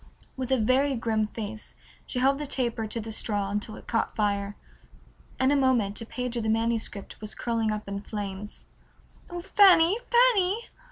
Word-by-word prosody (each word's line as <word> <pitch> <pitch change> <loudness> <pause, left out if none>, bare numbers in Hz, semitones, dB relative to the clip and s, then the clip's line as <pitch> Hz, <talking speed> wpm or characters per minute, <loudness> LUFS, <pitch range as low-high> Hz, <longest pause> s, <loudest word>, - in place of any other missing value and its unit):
With 260 0 -4
a 265 - +4
very 260 +5 +2
grim 220 -2 0
face 215 0 -7 0.3
she - - -5
held 270 +2 +3
the 295 - -4
taper 235 -4 -1
to 220 +2 -3
the 225 0 -6
straw 205 -2 0
until 210 +1 -3
it - - -12
caught 225 - -1
fire. 200 -1 0 0.8
In 260 +1 +3
a - - +4
moment 245 -7 +2
a 230 - -7
page 250 0 -3
of 235 - -1
the 220 - -1
manuscript 225 -3 -2
was 215 - -4
curling 230 -2 -1
up 215 -1 -4
in 200 0 -4
flames. 205 -1 -6 0.6
"Oh, 350 -1 -5
Fanny, 385 0 +5
Fanny!" 465 -3 +3
230 Hz, 175 wpm, -27 LUFS, 215-270 Hz, 0.8 s, Fanny